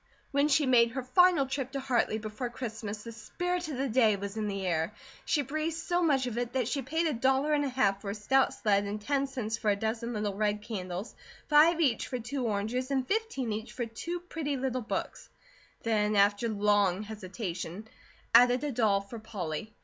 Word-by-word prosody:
When 280 0 +3
she 300 0 +3
made 240 -3 +5
her 265 -1 -3
final 340 +2 +4
trip 265 0 -4
to 275 - -2
Hartley 255 -5 +1
before 220 +3 -5
Christmas 220 -3 -6
the 230 - -7
spirit 355 +10 -3
of 280 - -4
the 270 +1 0
day 225 -3 +4
was 200 +1 -6
in 215 -1 -2
the 195 -1 -3
air. 170 +3 -1 0.3
She 300 -3 +1
breathed 310 +4 -2
so 350 +1 0
much 280 -6 +3
of 240 -1 -3
it 245 0 -3
that 255 -4 0
she 275 - -1
paid 320 +6 -1
a 310 - +1
dollar 265 +5 +2
and 290 -1 +2
a 280 - -1
half 200 -7 +1
for 200 - -5
a 200 - -3
stout 265 +6 +2
sled 205 -2 +1
and 205 +1 -3
ten 275 +5 0
cents 235 -5 -3
for 215 - 0
a 205 - +3
dozen 225 +3 -2
little 210 -2 -2
red 210 +1 -1
candles, 190 -2 -5 0.4
five 315 +3 +6
each 265 -9 +2
for 250 - -3
two 245 +2 -3
oranges, 220 +5 -1
and 265 -2 0
fifteen 395 - -1
each 220 +2 -6
for 245 - -2
two 335 +10 -5
pretty 310 -5 -3
little 255 -1 -1
books, 220 - -4 0.5
then 215 -2 +1
after 205 +3 +3
long 205 -2 +2
hesitation 200 -2 -6 0.5
added 245 +3 +6
a 295 - -1
doll 215 -5 +2
for 210 +4 -9
Polly. 210 -3 -5
235 Hz, 205 wpm, -30 LUFS, 210-275 Hz, 0.5 s, five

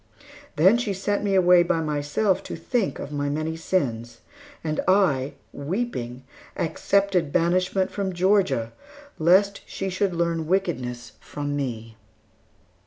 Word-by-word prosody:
Then 190 +10 +5
she 215 -5 -1
sent 205 +2 -1
me 200 -1 +1
away 180 -1 +6
by 175 -1 +1
myself 155 +6 0
to - - -5
think 210 +6 -1
of 145 - -7
my 145 -1 -2
many 155 +2 -2
sins; 120 -9 -2 0.4
and 155 -1 -2
I, 150 -8 +3 0.2
weeping, 140 - -4 0.3
accepted 185 -1 +1
banishment 185 +3 +1
from 195 -2 -2
Georgia, 175 - +1 0.5
lest 190 +5 +4
she 195 -1 -4
should 185 -1 0
learn 165 -2 -1
wickedness 130 -11 -2
from 145 -1 -5
me. 115 -5 -4
170 Hz, 125 wpm, -24 LUFS, 145-190 Hz, 0.5 s, away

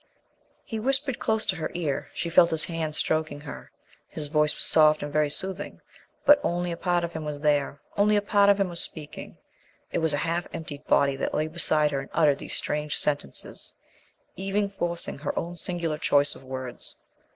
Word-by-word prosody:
He 225 - -4
whispered 270 +2 0
close 220 0 0
to - - +1
her 160 - -3
ear. 155 -6 -2
She 170 - -3
felt 170 0 +6
his 160 -2 +3
hand 160 -2 -3
stroking 155 -2 -1
her. 145 -1 -9 0.4
His 150 -2 -6
voice 150 -1 +2
was - - +1
soft 155 -1 +5
and 145 0 -5
very 150 -1 +2
soothing. 190 +6 -1 0.5
But 290 0 +8
only 175 0 -1
a - - -2
part 175 0 0
of 170 0 -3
him 160 - -4
was 150 -1 -5
there; 145 -1 +1 0.2
only 210 +1 +4
a 205 - +3
part 200 0 +4
of 200 0 +4
him 195 - +2
was 170 -1 -4
speaking; 150 -3 -8 0.5
it - - 0
was 160 -2 +3
a 145 - -1
half 170 +1 -1
emptied 145 -3 -7
body 140 -1 +3
that - - -2
lay 155 - +1
beside 155 -2 +2
her 140 - -1
and 135 - -8
uttered 150 -3 +3
these - - -5
strange 150 0 -1
sentences, 145 - -1 0.6
even 195 +2 -1
forcing 170 -6 -3
her 145 - -3
own 170 +1 -3
singular 170 -2 -3
choice 145 -1 +3
of - - -14
words. 130 -1 -7
160 Hz, 195 wpm, -26 LUFS, 150-175 Hz, 0.6 s, But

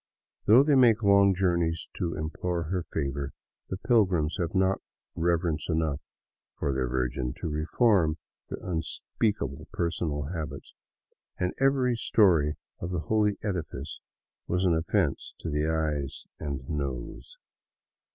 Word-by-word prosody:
Though 120 +6 +8
they 145 0 +3
make 120 -4 +5
long 100 -1 +5
journeys 85 -3 +1
to 85 -2 -1
implore 85 +2 -2
her 90 +2 -3
favor, 70 -2 -2 0.4
the 95 - -3
pilgrims 95 -9 +2
have 85 +1 -2
not 95 +1 +2 0.3
reverence 85 -2 0
enough 80 -3 0 0.6
for 70 - 0
their 65 -1 0
Virgin 65 0 -1
to - - -3
reform 80 +1 +2 0.3
their - - -4
unspeak 90 +5 -1
able 70 +3 -6
personal 80 -4 -1
habits, 75 -5 -6 0.6
and 90 0 -1
every 135 -2 +3
story 85 -10 +3 0.2
of 85 - -4
the 90 -3 -2
holy 105 -2 +3
edifice 90 -6 -4 0.5
was 90 +2 +1
an 90 - +4
of 80 0 -1
fence - - 0
to - - -5 0.2
eyes 75 -3 -2
and 70 -4 -4
nose. 70 - -5
85 Hz, 130 wpm, -28 LUFS, 75-95 Hz, 0.6 s, Though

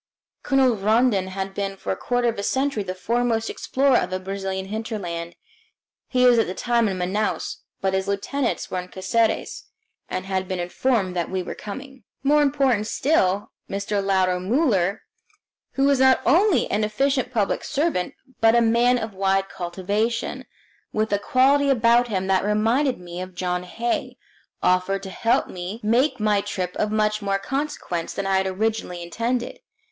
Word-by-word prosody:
Colonel 265 -3 +3
Rondon 215 -1 +2
has 190 +1 -4
been 195 0 -4
for - - -4
a - - 0
quarter 245 +4 0
of 225 -3 -1
a - - -1
century 265 +1 0
the 185 -2 -4
foremost 230 +3 0
explorer 270 -1 +2
of - - 0
the 185 0 -2
Brazilian 190 0 -4
hinterland. 190 -6 -5 0.7
He 250 -1 +2
was 245 -2 +6
at 225 - +2
the 185 - -4
time 235 -2 +1
in 190 - -3
Manaos, 190 +4 -1 0.2
but 190 0 0
his 190 0 0
lieutenants 235 +6 -2
were 185 - -1
in 180 - -7
Caceres 220 +5 -1 0.4
and 185 0 -3
had 190 -1 -2
been 185 - -2
notified 185 +2 0
that 175 -2 -2
we 185 -1 -2
were - - -5
coming. 265 +4 -9 0.2
More 295 +2 +4
important 270 -7 +2
still, 205 -10 +1 0.2
Mr. 200 0 -2
Lauro 185 -2 +2
Muller 200 - +1 0.7
who 275 0 +2
is 280 -2 +3
not 265 0 +5
only 360 - +4
an 210 +1 +1
efficient 260 +6 0
public 215 -5 0
servant 290 - -1 0.2
but 225 +1 +5
a - - +6
man 235 +2 +3
of 220 -3 -4
wide 195 0 +1
cultivation, 200 +6 -2 0.4
with 215 -1 0
a 205 - +2
quality 275 +6 +3
about 240 -1 +4
him 190 -4 -1
that 190 -1 +2
reminded 225 +6 +1
me 175 0 -7
of 185 0 -8
John 180 0 -1
Hay 235 +6 -3 0.5
offered 185 +2 +2
to 190 - -6
help 230 +4 +1
me 185 +5 -6
make 255 +5 +2
my 210 -1 +2
trip 180 -2 -4
of 210 - 0
much 215 0 +1
more 195 -1 0
consequence 235 - -3
than 200 - -2
I 195 0 +2
had 190 0 +1
originally 190 -3 -2
intended. 235 - -2
210 Hz, 170 wpm, -23 LUFS, 190-245 Hz, 0.7 s, was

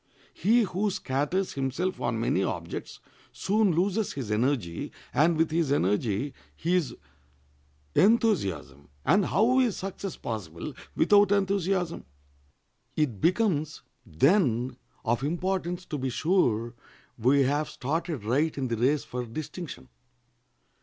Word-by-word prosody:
He 225 +7 +3
who 200 +1 -1
scatters 150 +3 -1
himself 135 +7 -2
on 115 -1 -1
many 95 -4 +1
objects 85 -2 -5 0.3
soon 210 0 +2
loses 195 +5 0
his 130 -7 -5
energy, 110 -6 -1 0.2
and 155 +5 +3
with 160 0 +2
his 160 -3 +1
energy 105 +2 +1 0.2
his 170 -5 0 1.0
enthusiasm—and 100 - +2
how 240 +6 +3
is 245 -6 +2
success 195 0 -5
possible 90 -8 -5 0.2
without 205 -1 +5
enthusiasm? 195 -3 0 0.9
It 130 -11 0
becomes, 170 -5 +1 0.2
then, 130 - +2 0.3
of 120 +1 +1
importance 175 +2 -2
to 150 - -4
be 130 0 -1
sure 120 - +1 0.5
we 135 +5 +4
have 145 +3 0
started 155 - -3
right 140 +9 +1
in 130 -2 -2
the 115 - -1
race 135 +6 +2
for 125 0 -4
distinction. 155 +7 -7
150 Hz, 115 wpm, -27 LUFS, 120-185 Hz, 1.0 s, without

